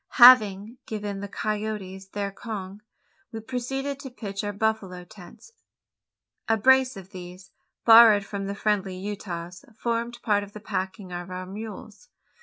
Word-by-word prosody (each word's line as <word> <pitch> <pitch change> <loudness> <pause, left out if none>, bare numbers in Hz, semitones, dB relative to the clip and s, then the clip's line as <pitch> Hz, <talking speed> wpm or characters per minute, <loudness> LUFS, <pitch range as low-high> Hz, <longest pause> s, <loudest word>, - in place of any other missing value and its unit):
Having 230 -3 +7
given 205 -2 -4
the 200 - -5
coyotes 205 -2 -4
their 200 0 -4
conge, 200 -2 -7 0.5
we 225 - -5
proceeded 265 +4 -4
to 275 -2 -8
pitch 205 -5 -6
our 205 - -2
buffalo 205 -4 -2
tents. 200 - -15 1.0
A 225 - +4
brace 260 +1 +4
of 190 -1 -11
these, 180 0 -11 0.3
borrowed 225 -3 +8
from 195 -1 -5
the 200 - -4
friendly 200 -3 -1
Utahs, 180 -2 -6
formed 235 +1 -2
part 205 -2 +2
of 205 0 -10
the 210 - -8
packing 190 -1 -4
of 175 +1 -6
our 185 0 -5
mules. 210 +1 -9
205 Hz, 145 wpm, -26 LUFS, 190-225 Hz, 1.0 s, borrowed